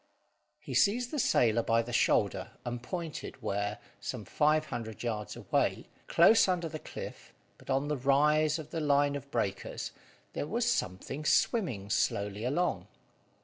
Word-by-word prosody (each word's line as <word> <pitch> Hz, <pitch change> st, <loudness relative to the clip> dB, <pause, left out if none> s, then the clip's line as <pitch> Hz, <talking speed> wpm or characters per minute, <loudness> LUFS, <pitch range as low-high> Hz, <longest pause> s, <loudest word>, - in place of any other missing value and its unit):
He -, -, -8 dB
seized 240 Hz, +4 st, +3 dB
the 300 Hz, -, -2 dB
sailor 115 Hz, -, +3 dB
by 115 Hz, 0 st, +2 dB
the 120 Hz, +1 st, -7 dB
shoulder, -, -, +2 dB
and 120 Hz, 0 st, -4 dB
pointed 165 Hz, +1 st, -5 dB
where, 105 Hz, -1 st, -2 dB, 0.2 s
some 120 Hz, -5 st, -5 dB
five 155 Hz, +1 st, +2 dB
hundred 115 Hz, -4 st, -6 dB
yards 110 Hz, -3 st, -3 dB
away, -, -, -1 dB, 0.2 s
close 200 Hz, +6 st, +6 dB
under 180 Hz, -2 st, 0 dB
the 155 Hz, 0 st, -6 dB
cliff, -, -, -8 dB, 0.3 s
but -, -, -17 dB
on 135 Hz, +2 st, +1 dB
the 150 Hz, -1 st, -1 dB
rise 150 Hz, +4 st, +3 dB
of 155 Hz, -3 st, -9 dB
the 165 Hz, -, -2 dB
line 145 Hz, -1 st, +3 dB
of 140 Hz, 0 st, -7 dB
breakers, 100 Hz, -7 st, -3 dB, 0.4 s
there 145 Hz, -, -3 dB
was 235 Hz, +6 st, 0 dB
something 135 Hz, -, -2 dB
swimming 125 Hz, -, +1 dB
slowly 105 Hz, -1 st, 0 dB
along. 175 Hz, +8 st, 0 dB
140 Hz, 150 wpm, -31 LUFS, 115-160 Hz, 0.4 s, close